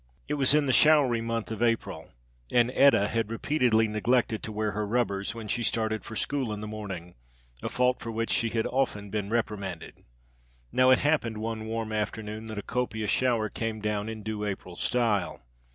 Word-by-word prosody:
It 150 - -2
was 140 0 +3
in 150 -1 +3
the 130 - +2
showery 140 -5 +5
month 115 -1 -3
of 110 0 -4
April, 115 -1 0 0.4
and 120 0 +3
Etta 135 -7 +5
had 115 -2 -1
repeatedly 115 -2 +2
neglected 110 +1 +1
to 110 - -5
wear 105 0 -1
her 105 +1 -2
rubbers 100 -2 -1
when 115 -2 -7
she 120 - -1
started 110 -2 -1
for 110 - -8
school 135 -1 -1
in 105 - -4
the 105 - -5
morning, 100 -5 -6 0.5
a - - -3
fault 125 0 +1
for 115 - -6
which 115 +1 -2
she 115 - +2
had 115 0 -1
often 105 -7 -1
been 105 -2 -2
reprimanded. 100 -6 -3 0.7
Now 130 0 +4
it 130 - +7
happened 145 -7 +1
one 110 0 -4
warm 110 -1 -3
afternoon 110 0 -3
that 110 -1 -6
a 105 - -4
copious 110 -4 -2
shower 120 -4 +2
came 110 0 -4
down 105 0 -2
in 110 -1 -6
due 110 -1 -3
April 95 -3 -4
style. 110 -2 0
110 Hz, 190 wpm, -28 LUFS, 105-120 Hz, 0.7 s, it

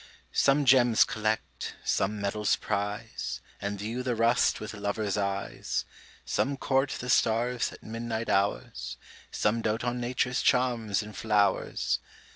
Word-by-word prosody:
Some 140 +1 +3
gems 120 -3 +6
collect; 110 0 -2
some 105 +2 0
medals 100 +1 +1
prize, 105 - -3 0.2
And 100 0 -2
view 110 +5 -3
the 125 -1 -1
rust 115 +2 +3
with 110 +1 -6
lover's 100 0 -2
eyes; 100 -1 -2 0.4
Some 140 +1 0
court 135 +1 +1
the 125 - -5
stars 120 +1 +2
at - - -13
midnight 115 0 -4
hours; 100 +1 -1 0.3
Some 110 +2 +1
dote 110 +1 -1
on 120 0 -1
Nature's 125 +1 0
charms 120 -6 +2
in 105 0 -9
flowers! 100 - +1
110 Hz, 130 wpm, -29 LUFS, 105-120 Hz, 0.4 s, gems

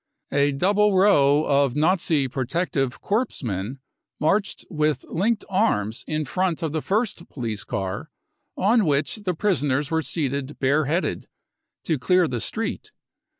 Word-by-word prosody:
A 140 0 +3
double 200 +7 +2
row 150 -7 +5
of 140 -2 +2
Nazi 160 -3 +2
protective 135 0 -2
corps 220 - -1
men 105 +3 -3 0.4
marched 195 +7 0
with 155 -3 0
linked 210 +6 0
arms 130 - 0
in 155 0 -1
front 180 +3 -1
of 160 - -1
the 155 0 -2
first 200 -2 -1
police 115 -6 -4
car, 105 +7 -4 0.5
on 215 +2 +3
which 145 +5 +1
the 190 -4 -3
prisoners 150 -7 0
were 160 0 +2
seated 140 -1 -3
bare 145 +3 +2
headed, 165 +6 -1 0.6
to 160 -5 -1
clear 180 +5 +3
the 125 -4 -3
street. 225 0 -3
155 Hz, 140 wpm, -24 LUFS, 135-185 Hz, 0.6 s, row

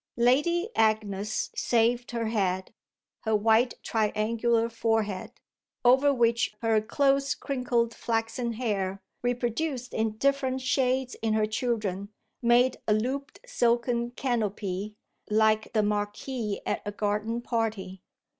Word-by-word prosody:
Lady 295 - +3
Agnes 215 -1 0
saved 240 +1 +1
her 235 -1 -2
head, 190 -4 -1 0.5
her 220 -1 0
white 225 +3 +3
triangular 225 +2 +1
forehead, 225 -4 -1 0.5
over 265 +4 +6
which 235 -4 +1
her 225 -1 +3
close 275 +4 +1
crinkled 245 -4 -1
flaxen 230 +1 -2
hair, 200 -5 -2 0.2
reproduced 245 +2 -2
in 220 -1 -1
different 270 0 +1
shades 260 -1 0
in 220 -1 +1
her 215 -1 +3
children, 215 -4 -2 0.3
made 245 +1 +4
a 210 - +4
looped 265 +6 -3
silken 240 - +1
canopy 210 -5 -2 0.3
like 215 0 +2
the 215 -2 +3
marquee 210 +2 -2
at - - -1
a 205 - -4
garden 210 +3 -1
party. 220 -6 -3
230 Hz, 115 wpm, -27 LUFS, 215-245 Hz, 0.5 s, over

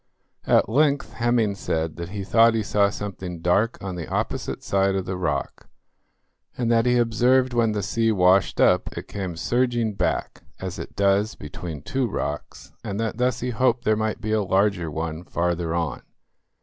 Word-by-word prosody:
At - - +4
length 140 +5 +1
Hemming 120 -3 +1
said 80 -4 -2
that 85 0 -5
he 100 0 -5
thought 115 +3 +4
he 110 - 0
saw 100 0 +2
something 95 -4 -6
dark 100 +7 +1
on 95 -1 -4
the 85 -3 -5
opposite - - -3
side 95 0 +1
of 95 -1 -2
the 95 0 -3
rock, 85 -6 -3 0.9
and 120 -2 0
that 115 +1 +3
he 125 0 +4
observed 125 +2 +3
when 115 -2 +2
the 105 -1 -2
sea 115 +3 +1
washed 95 -1 +3
up - - +3
it - - -6
came 95 -4 -5
surging 120 +4 0
back - - -2 0.2
as 95 -1 -5
it - - -8
does 100 +2 +2
between 75 0 -7
two 130 +5 -1
rocks, - - -5
and 100 +1 -4
that 110 -1 -2
thus 125 -1 +1
he 125 +1 -2
hoped 120 0 +1
there 110 - +3
might 110 0 -2
be 110 - -3
a 110 -1 +2
larger 95 -3 +1
one 80 +2 -4
farther 85 -1 -1
on. 85 -3 -2
100 Hz, 180 wpm, -24 LUFS, 90-115 Hz, 0.9 s, At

